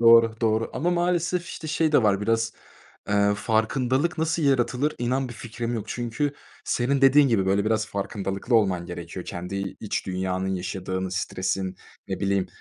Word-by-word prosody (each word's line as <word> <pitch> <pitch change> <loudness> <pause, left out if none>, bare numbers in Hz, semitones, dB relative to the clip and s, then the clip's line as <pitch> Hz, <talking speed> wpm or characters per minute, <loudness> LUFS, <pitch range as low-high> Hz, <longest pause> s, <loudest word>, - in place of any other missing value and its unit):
Doğru, 115 -1 +7
doğru 110 -1 +1
ama 175 - 0
maalesef, 175 0 +1
işte, 160 - -7
şey 155 0 +1
de 145 - +5
var 100 -2 +3
biraz, 115 +1 +1 0.6
eee, 100 0 +3
farkındalık 130 +9 +1
nasıl 160 +1 0
yaratılır, 135 +1 +2
inan 130 +2 0
bir 120 - -8
fikrim 120 +1 -4
yok. 110 -2 -3
Çünkü 120 +5 -2 0.3
senin 135 +3 +1
dediğin 135 +1 +6
gibi, 100 -6 +2
böyle, 100 +1 +2
biraz 110 0 +1
farkındalıklı 100 +2 -3
olman 95 -6 +3
gerekiyor. 90 0 -7
Kendi 90 +3 -5 0.2
iç 105 - -3
dünyanın 95 0 -1
yaşadığını, 95 0 -3
stresin, 95 0 -2 0.3
ne 95 - -3
bileyim, 100 -1 +1
110 Hz, 155 wpm, -25 LUFS, 95-135 Hz, 0.6 s, Doğru